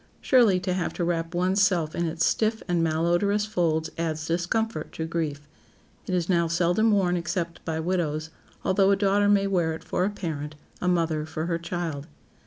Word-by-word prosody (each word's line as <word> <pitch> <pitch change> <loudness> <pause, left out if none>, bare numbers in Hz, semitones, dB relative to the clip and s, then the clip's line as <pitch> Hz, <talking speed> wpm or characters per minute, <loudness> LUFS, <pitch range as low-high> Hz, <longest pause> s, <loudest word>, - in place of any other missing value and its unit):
Surely 230 -8 +4
to 185 0 -2
have 180 -2 -2
to 175 - -2
wrap 170 0 -1
one's 185 +3 +2
self 170 -5 +2
in 170 0 -1
its 165 +1 0
stiff 220 0 +1
and 175 -2 +1
malodorous 175 +6 +1
folds 160 -6 0
adds 160 -2 -2
discomfort 175 +2 -1
to 160 - -3
grief. 155 -3 -3 0.6
It 185 - 0
is 175 -2 0
now 170 -3 +2
seldom 175 +6 +2
worn 190 -4 +2
except 170 0 -3
by 160 -1 -2
widows, 160 -3 -1 0.3
although 195 +1 +3
a 200 - +5
daughter 200 +1 +2
may 200 -1 +4
wear 175 -5 +1
it - - -11
for 180 - -1
a 195 - +2
parent, 155 -7 -5 0.3
a 180 - -1
mother 165 -3 +1
for 160 0 -4
her 170 -1 -1
child. 165 -4 -4
175 Hz, 190 wpm, -26 LUFS, 160-190 Hz, 0.6 s, a